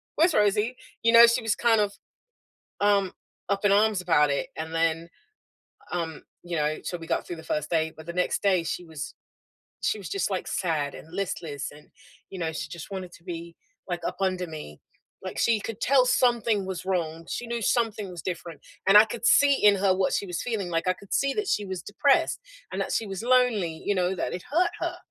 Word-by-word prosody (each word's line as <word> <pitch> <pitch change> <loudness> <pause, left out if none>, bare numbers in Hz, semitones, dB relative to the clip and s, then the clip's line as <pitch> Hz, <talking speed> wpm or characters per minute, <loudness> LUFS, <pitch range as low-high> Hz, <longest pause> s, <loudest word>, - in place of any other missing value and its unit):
Where's 330 +2 +4
Rosie?" 210 +3 +2 0.3
You 230 - +5
know, 235 0 +10
she 235 +2 +2
was 225 -2 0
kind 225 -3 +3
of, 200 -1 0 0.9
um, 200 -2 +3 0.4
up 200 +1 -1
in 205 - +5
arms 210 -1 +3
about 155 -5 +3
it, 140 - -1
and 160 +1 -5
then, 165 0 0 0.8
um, 165 -3 -3 0.2
you 175 -1 -4
know 150 0 0
so, 175 - -4
we 165 -1 -10
got - - -1
through 175 - -5
the 160 - -10
first 150 -1 -2
day, 160 -1 +1
but 160 +1 -11
the 170 - -4
next 180 0 0
day, 190 -4 +3
she 175 +2 -4
was 160 -3 -7 0.7
she 215 - 0
was 185 -6 -7
just, 195 -2 -1
like, 185 - -2
sad 155 -6 -1
and 160 - -12
listless, 165 -7 -3
and, 150 +1 -16 0.4
you 190 - -7
know, 165 -2 -1
she 155 -1 -5
just 160 +2 -9
wanted 185 -2 -5
to 170 - -16
be, 170 -1 -7 0.3
like, 175 -1 -3
up - - -3
under 185 -2 0
me, 150 - -9 0.4
like, - - -6
she 230 -2 +3
could 220 +1 -6
tell 265 +1 +4
something 235 -5 +2
was 185 -3 -5
wrong. 165 -3 -2
She 245 - -3
knew 235 0 -3
something 220 -4 0
was 175 -2 -8
different, 170 -2 -5 0.3
and 195 - +8
I 215 - +9
could 225 +1 -7
see 280 +3 +6
in 205 -1 +7
her 195 -1 +3
what 185 0 +1
she - - 0
was 175 -2 -3
feeling, 215 -7 -2
like, 165 +2 -1
I 185 - +4
could 200 +1 -10
see 275 0 +2
that 420 -1 -1
she 210 - +1
was 190 -3 -5
depressed 285 +10 +2 0.3
and - - -2
that - - -3
she 225 - 0
was 195 -2 -5
lonely, 235 -10 +2
you 205 - +2
know, 185 +1 +1
that - - -3
it 180 - -5
hurt 350 +5 +3
her. - - -3
185 Hz, 220 wpm, -26 LUFS, 165-215 Hz, 0.9 s, know